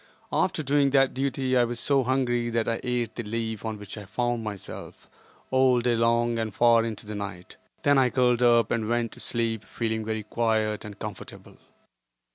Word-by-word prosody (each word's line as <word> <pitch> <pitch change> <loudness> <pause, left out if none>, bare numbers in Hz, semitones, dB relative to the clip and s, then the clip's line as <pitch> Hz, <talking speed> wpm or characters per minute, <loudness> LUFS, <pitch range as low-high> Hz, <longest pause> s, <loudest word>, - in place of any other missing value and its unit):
After 155 - +1
doing 140 0 +3
that 135 -1 +3
duty 135 -1 -1
I 125 - +5
was 120 0 -2
so 140 +1 +3
hungry 120 -2 0
that 115 -1 -1
I 115 - 0
ate 125 -2 -1
the - - -4
leaf 110 0 -4
on 110 -1 -3
which 105 +1 -8
I 105 - -9
found 120 +2 -1
myself, 105 -3 -8 0.4
all 130 -1 +4
day 120 0 +1
long 115 0 +2
and 110 -1 -2
far 115 +2 +4
into 110 -2 -5
the 105 - -6
night. 100 -3 -7 0.3
Then 145 -1 +5
I 130 -1 +4
curled 125 -1 +2
up 120 -2 +4
and 110 -2 -1
went 120 -1 0
to - - -13
sleep 115 -2 -1
feeling 110 0 -3
very 110 0 -3
quiet 110 -1 0
and 105 -1 -9
comfortable. - - -9
115 Hz, 190 wpm, -26 LUFS, 110-125 Hz, 0.4 s, I